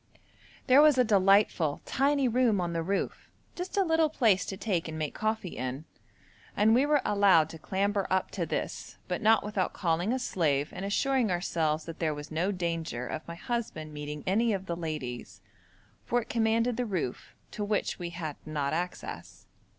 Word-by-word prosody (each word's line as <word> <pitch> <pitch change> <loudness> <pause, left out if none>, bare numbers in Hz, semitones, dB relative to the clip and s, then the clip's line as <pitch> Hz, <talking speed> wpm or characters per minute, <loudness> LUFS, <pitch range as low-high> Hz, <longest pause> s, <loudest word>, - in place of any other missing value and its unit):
There 265 +2 +7
was 300 -3 +6
a 250 - +6
delightful, 195 -7 +3
tiny 275 0 +2
room 235 -4 +2
on 175 -1 -2
the 165 - -1
roof, 195 +4 -3 0.2
just 360 +2 -5
a 395 - +5
little 325 -2 +2
place 220 -11 +2
to 195 - -5
take 190 -5 -1
and 160 0 -5
make 155 -2 -3
coffee 215 -4 -2
in, 130 +4 -4 0.7
and 215 +2 +5
we 260 +5 +4
were 295 -2 +3
allowed 195 -6 +4
to 160 - -10
clamber 200 +3 -1
up 190 0 0
to - - -3
this, - - -4
but - - -2
not 220 0 +4
without 205 -3 -1
calling 175 +3 0
a 260 - +1
slave 150 - 0
and 195 - -5
assuring 255 +3 +1
ourselves 160 -3 0
that 165 0 -8
there 155 -3 0
was 145 +1 -8
no 170 +5 0
danger 165 -9 -3
of 155 - -6
my 170 - -6
husband 170 -8 -4
meeting 150 0 -6
any 220 +4 +2
of 190 -1 -3
the 170 - -3
ladies, 125 - -5 0.6
for 245 - +1
it - - -21
commanded 230 +1 +1
the 250 - 0
roof, 175 - -4 0.2
to 210 - -4
which 205 -1 -1
we 175 -1 -4
had 165 -4 -5
not 150 -2 -2
access. 175 +2 -5
190 Hz, 185 wpm, -29 LUFS, 160-225 Hz, 0.7 s, There